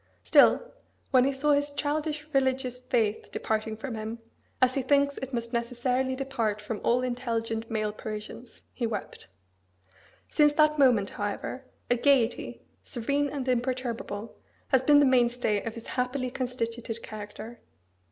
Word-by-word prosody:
Still, - - +5 0.4
when 255 -2 +5
he 275 - +2
saw 280 +2 +1
his 285 0 +1
childish 300 +1 -2
religious 260 -2 +1
faith 230 -4 -1
departing 220 0 -2
from 240 +2 -5
him, 220 +1 -5 0.4
as 255 0 +4
he 275 - 0
thinks 280 +1 +2
it 265 0 -6
must 235 -1 -3
necessarily 250 +2 0
depart 235 -6 -1
from 210 0 -5
all 245 +2 +2
intelligent 230 -2 -2
male 215 -1 -1
Parisians, 215 +3 -8
he 235 - -1
wept. 215 -3 -5 1.0
Since 295 -1 +4
that 305 0 +3
moment, 240 -7 +4
however, 205 +6 -4 0.3
a 245 - +4
gaiety, 260 -2 +2 0.2
serene 280 +4 -1
and 275 -2 -4
imperturbable, 240 -4 -2 0.3
has 265 -2 +4
been 290 +2 +6
the - - +5
mainstay 240 -4 +2
of 230 0 -5
his 230 - -9
happily 255 0 -2
constituted 235 -3 -3
character. 215 +2 -8
250 Hz, 140 wpm, -28 LUFS, 225-270 Hz, 1.0 s, been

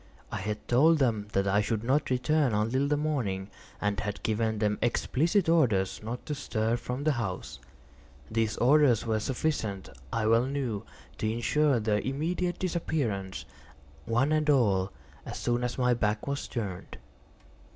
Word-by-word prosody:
I - - -2
had 105 +2 -4
told 155 +7 +5
them 115 -7 +1
that 100 0 +2
I 100 +2 +3
should 105 +1 -1
not 140 +5 +1
return 130 +1 +2
until 120 +7 +1
the 145 0 +1
morning, 115 -11 -2 0.3
and 105 0 -1
had 105 -1 -4
given 110 0 0
them 105 0 0
explicit 165 - +1
orders 115 - +2
not 115 +3 -6
to 150 - -3
stir 115 -5 -1
from 125 +3 -4
the 155 - +3
house. 110 - -4 0.7
These 110 -1 0
orders 130 -3 +4
were 110 -1 +1
sufficient, 110 -6 -2 0.2
I 115 -1 0
well 115 +3 +4
knew, 130 -7 -2 0.4
to 110 - 0
insure 135 +3 +2
their 105 -1 +1
immediate 170 +8 -1
disappearance, 135 - -2 0.6
one 130 +6 +2
and 155 0 +2
all, 100 -9 +3 0.3
as - - -6
soon 120 0 0
as 125 0 -2
my 125 -1 +3
back 105 -2 -1
was 140 0 -3
turned. 100 -7 -5
120 Hz, 155 wpm, -29 LUFS, 105-140 Hz, 0.7 s, told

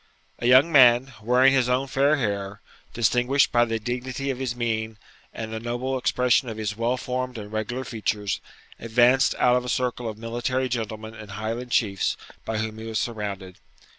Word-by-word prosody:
A 120 - -1
young 130 +6 +6
man, 130 -2 +6
wearing 125 +4 +4
his 130 -2 +2
own 130 +2 +1
fair 140 +3 +2
hair, 100 -6 -3 0.3
distinguished 125 +4 +2
by 120 0 +4
the 115 -1 -2
dignity 125 +4 -3
of 130 - -6
his 130 -2 -2
mien 110 -2 -2 0.3
and 110 0 -6
the 110 - -3
noble 120 +3 -3
expression 125 -1 +2
of 110 - -6
his 105 -1 -3
well 120 +3 0
formed 125 0 -3
and 105 -1 -8
regular 110 +4 -3
features, 105 -4 -2 0.4
advanced 120 +4 +3
out 125 0 +4
of 125 - +1
a 125 - -5
circle 125 -2 -1
of 105 - -7
military 120 +3 -2
gentlemen 110 -2 -4
and 110 -2 -11
Highland 115 +4 -4
chiefs 100 -5 0 0.3
by 110 - -2
whom 110 0 -3
he 110 - -7
was 110 -1 -3
surrounded. 100 -5 -4
120 Hz, 180 wpm, -25 LUFS, 110-125 Hz, 0.4 s, young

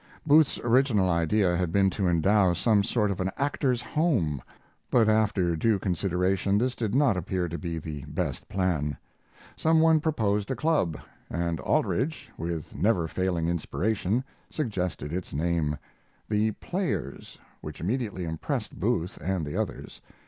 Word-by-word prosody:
Booth's 150 0 +5
original 120 -6 +3
idea 90 +3 +2
had 90 -2 -1
been 95 +1 +3
to 95 0 -1
endow 90 +2 +3
some 100 +3 +3
sort 105 -1 +1
of 95 - -3
an 95 - 0
actors' 135 -3 0
home, 115 - 0 0.5
but 115 -3 +4
after 105 -5 +2
due 110 +6 +2
consideration 95 +1 0
this 125 +3 +1
did 110 -1 -2
not 135 -7 +4
appear 90 0 -2
to 85 +1 -5
be 85 -2 -4
the 75 -3 -6
best 75 0 -4
plan. 85 -6 0 0.6
Some 160 0 +3
one 160 0 +5
proposed 105 -10 0
a 130 - -1
club, 145 - +1 0.3
and 85 0 -2
Aldrich, 150 +7 -1
with 85 -2 -4
never 90 0 +2
failing 90 -1 -1
inspiration, 100 +6 -1 0.3
suggested 90 - -3
its 90 0 -4
name, 80 -1 0 0.5
The 105 +1 +2
Players, 175 - -4 0.2
which 75 -1 -8
immediately 100 -2 -2
impressed 80 -1 -4
Booth 85 +3 -1
and 90 0 -1
the 75 - -5
others. - - -4
95 Hz, 145 wpm, -27 LUFS, 85-115 Hz, 0.6 s, Booth's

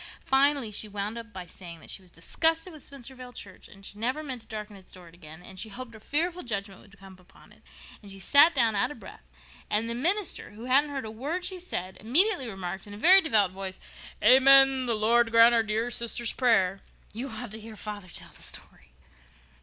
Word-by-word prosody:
Finally 270 -3 +2
she 210 +1 -2
wound 205 +1 -4
up 230 -1 -8
by 185 -3 -8
saying 170 -1 -12
that - - -10
she - - -6
was 185 - -14
disgusted 325 - 0
with 310 - -12
Spencervale 255 -2 -10
church 195 -2 -9
and 195 0 -16
she 205 - -10
never 255 +7 -2
meant 260 -5 -5
to - - -19
darken 210 -2 -7
its 190 -1 -14
door 180 -2 -13
again, 165 0 -14
and 190 0 -10
she 220 - -4
hoped 240 +2 -9
a 220 - -12
fearful 335 +9 -1
judgment 200 -4 -4
would 195 -1 -19
come 195 0 -14
upon 180 +1 -21
it. - - -21 0.4
Then 205 - -13
she 195 - -9
sat 285 - +5
down 230 -5 +2
out 200 - +1
of 295 - -10
breath, - - -12 0.5
and 215 +2 +1
the 230 - -2
minister, 350 - 0
who 220 +3 -10
hadn't 275 +4 +3
heard 275 -4 -4
a 215 - -6
word 295 +11 -4
she 370 0 -3
said, 190 - -5
immediately 270 - +2
remarked, 190 -1 -6
in 205 - -9
a - - -10
very 370 - +7
devout 215 - +2
voice, 190 0 -6 0.4
'amen! 270 0 +6
The 235 - +1
Lord 230 +2 +3
grant 230 +1 +7
our 230 - +4
dear 220 +2 -2
sister's 235 0 -1
prayer!' 195 -7 +2 0.3
You 245 +5 -5
ought 230 0 -7
to 220 - -7
hear 220 0 -10
father 205 -2 -7
tell 175 - -6
the - - -16
story." 60 +1 -10
225 Hz, 220 wpm, -27 LUFS, 195-265 Hz, 0.5 s, very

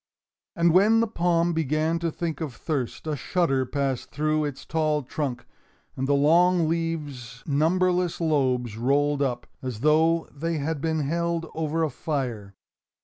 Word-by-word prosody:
And 170 -2 +3
when 210 +5 +5
the 230 - +3
palm 175 -4 +1
began 160 +1 0
to 170 0 -1
think 165 -2 -4
of 145 -7 -4
thirst, 140 -3 -3
a 155 -1 -1
shudder 135 -3 0
passed 135 -2 -2
through 155 +1 0
its 145 -2 -6
tall 155 -2 0
trunk, 130 -2 -4 0.5
and 135 +1 -2
the 145 - +3
long 170 +4 +4
leaves' 150 -7 -3
numberless 175 +4 +1
lobes 130 -8 0
rolled 145 +4 +1
up, 130 -4 -1 0.2
as 125 -4 -5
though 160 +3 +3
they 165 +3 -2
had 150 0 -2
been 160 0 0
held 170 +3 -1
over 160 +1 -1
a 155 - 0
fire. 120 -9 -4
155 Hz, 150 wpm, -25 LUFS, 135-165 Hz, 0.5 s, when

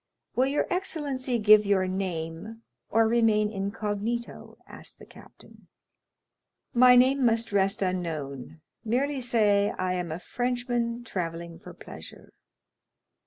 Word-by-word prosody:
"Will 260 +1 +3
your 285 +2 0
excellency 285 -9 -2
give 215 -1 +6
your 200 -2 +2
name, 185 +3 -5 0.3
or 225 0 +3
remain 220 -2 +2
incognito?" 210 +3 -4
asked - - -11
the - - -14
captain. - - -18 1.1
"My 250 0 +7
name 260 +2 +4
must 230 -2 +1
rest 195 +1 +1
unknown," 165 -7 -3
replied 135 - -8
Franz; 155 +6 -13 0.2
"merely 265 +5 -1
say 210 -4 +2
I 185 0 -1
am 180 -3 -3
a 160 - -3
Frenchman 245 +2 -2
travelling 170 -5 -5
for - - -12
pleasure." - - -12
215 Hz, 125 wpm, -27 LUFS, 185-245 Hz, 1.1 s, My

